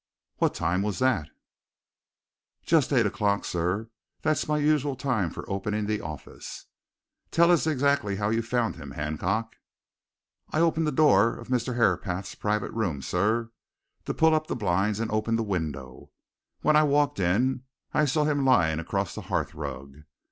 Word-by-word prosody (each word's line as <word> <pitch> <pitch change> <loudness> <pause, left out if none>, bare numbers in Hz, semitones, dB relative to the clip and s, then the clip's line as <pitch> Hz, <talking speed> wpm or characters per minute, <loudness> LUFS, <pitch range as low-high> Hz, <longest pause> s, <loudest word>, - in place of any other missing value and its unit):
"What - - +1
time 90 +2 0
was 105 -1 -2
that?" 115 -12 +1 1.4
"Just 155 -4 +3
eight 125 -5 +4
o'clock, 100 -1 0
sir 90 +6 -2 0.3
that's 155 -2 +1
my 150 0 +1
usual 145 -2 +1
time 125 -9 0
for - - -8
opening 105 +2 -2
the 105 0 -1
office." 75 -2 -8 0.6
"Tell 170 +1 +4
us 165 -2 +3
exactly 140 -8 +1
how 105 +1 -1
you 115 +1 +1
found 115 -2 -1
him, 70 -4 -9
Hancock." 90 +10 -2 0.9
"I 155 - -1
opened 165 -1 +2
the - - +1
door 115 -6 +4
of - - -11
Mr. 125 -1 0
Herapath's 95 -4 0
private 105 0 -1
room, 90 -12 -2
sir, 110 - 0 0.5
to - - -2
pull 160 0 +4
up 155 0 +1
the - - -2
blinds 100 -1 0
and 115 -1 -2
open 110 +1 0
the 115 - 0
window. 75 - -4 0.5
When 155 - +3
I 150 - +7
walked 145 -5 +2
in 120 +9 +1 0.3
I 150 - +3
saw 150 +2 +1
him 145 -2 +1
lying 85 -12 +3
across 95 +2 -2
the - - -6
hearth - - -1
rug. 70 +1 -7
110 Hz, 160 wpm, -27 LUFS, 95-140 Hz, 1.4 s, I